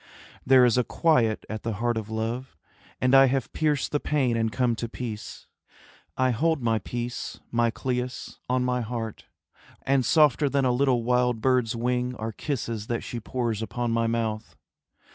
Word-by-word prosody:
There 130 -1 +6
is 125 0 +3
a - - +3
quiet 120 -8 +1
at 110 0 -5
the 115 - -3
heart 120 +3 -1
of 110 -1 -4
love, 115 +4 -4 0.4
And 125 +1 +2
I 135 0 +8
have 130 -1 -1
pierced 150 -3 0
the 145 - +1
pain 135 -6 +1
and 115 -1 0
come 120 +2 +1
to 115 - -4
peace. 115 -3 -7 0.7
I 130 0 +3
hold 160 +6 +1
my 115 -3 +1
peace, 120 +4 -5
my 120 0 +2
Cleis, 125 +1 -4
on 125 0 +1
my 125 0 0
heart; 115 -1 -5 0.6
And 135 -1 +2
softer 150 -1 +4
than 140 -1 +1
a 125 - +3
little 125 -1 +2
wild 125 -1 +2
bird's 125 -1 +1
wing 125 +1 -1
Are 110 0 -4
kisses 115 -4 -4
that 120 -1 -2
she 120 - -5
pours 115 -1 -2
upon 120 +1 -2
my 115 0 +1
mouth. 115 -2 -2
120 Hz, 175 wpm, -26 LUFS, 115-130 Hz, 0.7 s, I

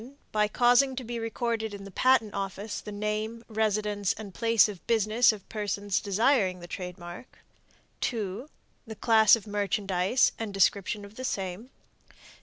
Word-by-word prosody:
By 210 -1 +2
causing 245 +4 +3
to 255 - -4
be 235 0 -5
recorded 225 -1 -2
in 200 - -9
the 200 - -10
Patent 240 0 +3
Office 200 +1 -4
the 210 - -8
name, 215 +2 -3
residence 210 -2 0
and 205 -3 -9
place 230 0 +4
of 200 -4 -9
business 225 +1 +4
of 210 -3 -10
persons 205 -2 -2
desiring 200 -2 +1
the 175 - -9
trademark. 180 +3 -8 0.6
2. 220 +3 -3 0.4
The 220 - -7
class 220 -1 +5
of 225 - -9
merchandise 205 +1 +1
and 215 -3 -4
description 200 +1 +1
of 200 +2 -15
the 255 - -6
same. 195 0 -4
210 Hz, 150 wpm, -28 LUFS, 200-230 Hz, 0.6 s, class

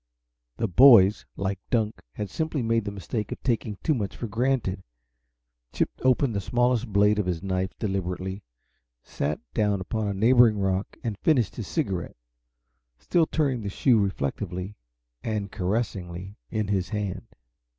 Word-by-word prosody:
The 115 - 0
boys, 105 -2 +7
like 95 0 -2
Dunk, 110 -3 0
had 105 - -4
simply 155 -4 -2
made 115 -1 +1
the 100 - -3
mistake 100 +2 -4
of - - -5
taking 115 -4 -1
too 155 - +3
much 105 -7 -3
for - - -4
granted. 115 -3 0 0.9
Chip - - 0
opened 130 -1 +2
the 100 - 0
smallest 120 +2 +1
blade 105 +1 +4
of 100 - -1
his 90 -1 -2
knife 95 -1 -2
deliberately, 95 -1 -3 0.6
sat 75 +1 -3
down 105 -2 +1
upon 105 +3 -2
a 100 - -1
neighboring 115 +1 +5
rock 95 0 -1
and 110 -4 -3
finished 120 - +2
his 110 - -5
cigarette, 95 - -2 0.8
still 165 - +1
turning 135 -6 0
the 100 - -3
shoe 115 +3 +3
reflectively 95 +1 -2 0.5
and 105 -3 -2
caressingly 95 -2 -3
in 110 -3 -2
his 95 -3 0
hand. 105 -3 -3
105 Hz, 150 wpm, -26 LUFS, 95-120 Hz, 0.9 s, boys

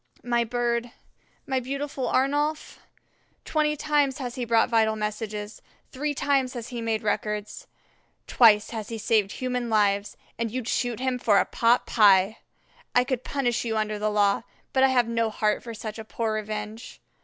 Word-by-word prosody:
"My 240 -1 +1
bird, 240 0 -1 0.6
my 265 -2 0
beautiful 275 +1 -4
Arnolf, 290 +3 0 0.7
twenty 305 -1 +1
times 290 -3 +1
has 250 -3 -5
he 250 -1 -3
brought 230 -1 +3
vital 220 -2 +2
messages, 210 0 -5 0.3
three 290 +2 -2
times 270 -2 +1
has 235 -1 -6
he 240 -2 -5
made 225 -1 -1
records, 210 - -3 0.6
twice 215 -3 +5
has 220 -3 -5
he 230 - -4
saved 210 -2 +1
human 250 -2 -3
lives, 205 -2 +1 0.2
and 230 -1 -1
you'd 245 +1 -4
shoot 245 -2 -1
him 255 -1 -1
for 210 -4 +3
a - - +4
pot 235 +1 +2
pie. 200 -1 +4 0.6
I 245 - +6
could 255 -1 -3
punish 260 -5 -1
you 225 -2 -2
under 215 -1 -1
the 215 +1 0
law, 205 -1 +2 0.3
but 265 - +3
I - - +7
have 250 -3 +2
no 230 -1 0
heart 215 -1 0
for 230 -1 -8
such 215 0 -7
a - - -5
poor 220 0 -2
revenge. 215 +1 -5
230 Hz, 170 wpm, -26 LUFS, 215-255 Hz, 0.7 s, I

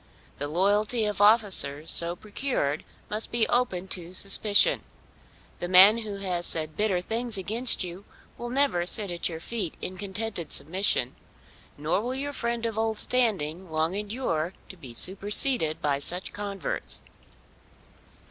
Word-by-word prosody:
The 145 - -3
loyalty 205 +7 +1
of 210 -1 -2
officers 200 -9 +4
so 170 +1 +3
procured 205 - -3 0.2
must 215 +1 -1
be 235 -2 +1
open 190 -7 0
to 175 0 -3
suspicion. 200 +2 +5 0.8
The 175 - -4
man 190 +5 +8
who 215 -3 -6
has 180 -3 -3
said 155 -1 -4
bitter 205 -4 0
things 225 +3 -2
against 225 +6 +1
you 180 +2 -8 0.3
will 240 - -7
never 255 -10 0
sit 205 -1 0
at 175 0 -2
your 160 -1 -7
feet 195 -2 -5
in 185 - -6
contented 200 -4 -2
submission, 155 -4 0 0.6
nor 155 +7 -1
will 250 +3 -4
your 285 +2 -4
friend 235 -2 -3
of 225 -1 -3
old 220 -1 -1
standing 190 -10 +1
long 160 +2 -1
endure 200 -5 -3 0.2
to - - -10
be 130 -9 -12
superseded 195 - +2
by 140 -2 0
such 180 +6 -3
converts. 200 -2 -2
195 Hz, 145 wpm, -26 LUFS, 170-225 Hz, 0.8 s, man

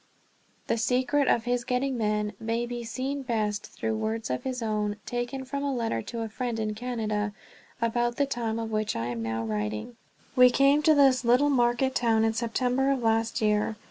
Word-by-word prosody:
The 230 - 0
secret 255 +4 +2
of 230 - +3
his 245 0 0
getting 255 +2 -1
men 210 -2 0
may 230 +1 -1
be 240 0 -5
seen 265 +4 -3
best 215 -5 -1
through 225 - -3
words 220 - -2
of 125 - -1
his 255 -2 -3
own, 210 -1 -1
taken 245 +2 -3
from 280 +2 -4
a 280 - 0
letter 230 - -1
to 230 - -6
a 225 - -2
friend 235 +1 -3
in 215 -1 -1
Canada 215 -3 -2 0.5
about 240 +1 0
the 285 - +2
time 235 -4 -2
of 225 -1 -4
which 215 0 -1
I 115 - -2
am 120 -1 -3
now 115 0 -2
writing: 105 - -3 0.4
"We 250 0 +8
came 275 +4 +4
to 310 0 +5
this 270 -3 +5
little 250 +5 +4
market 245 +1 +2
town 225 -3 +2
in 225 0 +2
September 250 +3 0
of 270 -3 0
last 225 0 +1
year. 210 0 +1
235 Hz, 195 wpm, -27 LUFS, 215-255 Hz, 0.5 s, We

